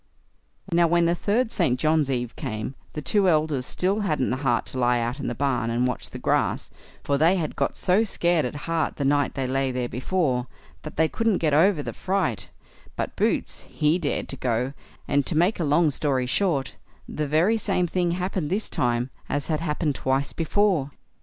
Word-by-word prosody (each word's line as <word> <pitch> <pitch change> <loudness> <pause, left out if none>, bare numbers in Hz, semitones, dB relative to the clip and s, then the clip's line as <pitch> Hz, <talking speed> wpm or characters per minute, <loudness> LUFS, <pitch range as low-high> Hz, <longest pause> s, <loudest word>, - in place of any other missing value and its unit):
Now, 170 0 +4
when 170 +1 +3
the 170 - +3
third 220 +7 0
St. 125 - +1
John's 155 -2 +2
eve 125 -3 -2
came, 110 +4 -4 0.2
the 150 - -5
two 195 +7 +3
elder 155 -4 +2
still 185 +10 -1
hadn't 155 - 0
the 130 - 0
heart 130 -3 0
to 130 - -5
lie 120 0 +3
out 120 +4 -2
in - - -3
the 120 - -2
barn 135 -4 0
and 120 +2 +1
watch 125 - -3
the - - -8
grass, - - 0 0.3
for 140 -1 0
they 165 +5 +5
had 160 -5 -2
got - - -1
so 190 +4 +3
scared 175 -6 +1
at 125 - -3
heart 165 -1 -1
the 140 - -2
night 145 0 +2
they 135 -1 -1
lay 135 +1 0
there 125 -1 -2
before, 130 -1 -1 0.3
that 155 - -8
they 160 +1 +4
couldn't 225 +2 +1
get 155 -3 +1
over 165 0 +4
the - - -5
fright; 185 - -1 0.5
but - - -3
Boots, - - -1
he 155 +4 +1
dared 150 -5 -2
to 135 - -5
go; 125 +2 -1 0.3
and, 145 0 +2
to 155 - 0
make 180 +6 +2
a - - +1
long 150 +1 +3
story 135 -3 0
short, 140 0 0 0.3
the 150 -1 -3
very 170 +10 +3
same 195 -4 0
thing 175 0 0
happened 180 -3 -2
this 205 +5 -1
time 120 +1 0 0.2
as 145 0 -1
had 155 - 0
happened 150 -2 -1
twice 135 +1 -1
before. 170 -3 +1
150 Hz, 200 wpm, -25 LUFS, 130-175 Hz, 0.5 s, they